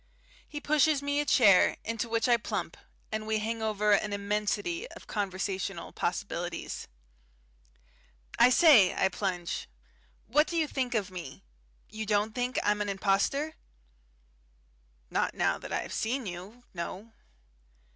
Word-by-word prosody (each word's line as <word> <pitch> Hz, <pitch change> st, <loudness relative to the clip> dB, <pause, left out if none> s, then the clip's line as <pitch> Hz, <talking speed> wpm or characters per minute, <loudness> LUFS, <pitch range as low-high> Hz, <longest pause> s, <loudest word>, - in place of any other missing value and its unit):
He 295 Hz, -, -5 dB
pushes 300 Hz, -1 st, +2 dB
me 285 Hz, 0 st, 0 dB
a 295 Hz, -, 0 dB
chair, 200 Hz, -7 st, +5 dB
into 230 Hz, +1 st, -2 dB
which 230 Hz, +2 st, +1 dB
I 240 Hz, -, +6 dB
plump, 230 Hz, -, -3 dB, 0.4 s
and 215 Hz, 0 st, -3 dB
we 220 Hz, 0 st, +1 dB
hang 225 Hz, +1 st, -3 dB
over 210 Hz, -1 st, +1 dB
an 205 Hz, 0 st, +2 dB
immensity 210 Hz, -, -1 dB
of -, -, -12 dB
conversational 195 Hz, -2 st, -3 dB
possibilities. 175 Hz, -1 st, -3 dB, 1.5 s
"I 240 Hz, -, +8 dB
say," 250 Hz, -, +6 dB
I 190 Hz, -, +2 dB
plunge, 180 Hz, -3 st, -3 dB, 0.6 s
"what 300 Hz, +7 st, +3 dB
do 340 Hz, -, -3 dB
you 320 Hz, -, +3 dB
think 255 Hz, -4 st, -2 dB
of 205 Hz, -3 st, -1 dB
me? 170 Hz, -7 st, -8 dB, 0.4 s
You 215 Hz, -1 st, -6 dB
don't 210 Hz, +1 st, +1 dB
think 250 Hz, +2 st, -2 dB
I'm 210 Hz, 0 st, +1 dB
an 205 Hz, -, -1 dB
impostor?" 200 Hz, +10 st, +1 dB, 1.6 s
"Not -, -, 0 dB
now -, -, +1 dB
that -, -, -9 dB
I -, -, 0 dB
have -, -, -7 dB
seen 245 Hz, +3 st, -1 dB
you. 190 Hz, +6 st, -8 dB
No." 185 Hz, +5 st, -6 dB
215 Hz, 140 wpm, -29 LUFS, 195-250 Hz, 1.6 s, I